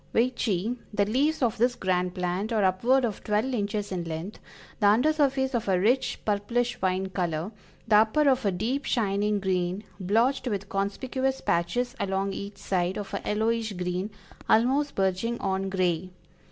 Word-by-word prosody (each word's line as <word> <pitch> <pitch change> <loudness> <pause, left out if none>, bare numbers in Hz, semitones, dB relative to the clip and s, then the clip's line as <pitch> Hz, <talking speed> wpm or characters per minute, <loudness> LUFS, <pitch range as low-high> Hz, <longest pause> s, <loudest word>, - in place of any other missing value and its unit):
Veitchii, 230 -2 +1
"The 205 -1 +2
leaves 275 +8 +1
of 235 -2 +1
this 245 +1 +3
grand 180 -2 0
plant 180 +4 -2
are 215 -3 +2
upward 235 +8 +3
of 215 -5 -4
twelve 215 +5 0
inches 205 -2 -2
in 180 -2 -2
length; 165 +5 -5 0.4
the 205 - +4
under 245 +10 +4
surface 270 -3 +1
of 235 -4 -1
a 185 -2 +3
rich 240 +7 +2
purplish 225 +4 0
wine 190 0 0
color, 175 0 -2 0.4
the 210 -1 +6
upper 225 +8 +4
of 265 -1 +3
a 200 - +2
deep 240 +10 -2
shining 210 -2 +1
green, 185 0 -1 0.2
blotched 230 +9 +1
with 205 -3 -3
conspicuous 260 +7 -1
patches 240 +9 0
along 195 0 -1
each 200 +1 -6
side, 180 -1 -1
of 205 -1 -6
a 200 - -2
yellowish 220 +1 0
green, 180 +2 -2 0.4
almost 270 +6 +3
verging 195 +5 0
on 195 0 -1
gray. 185 -2 0
205 Hz, 165 wpm, -27 LUFS, 190-245 Hz, 0.4 s, the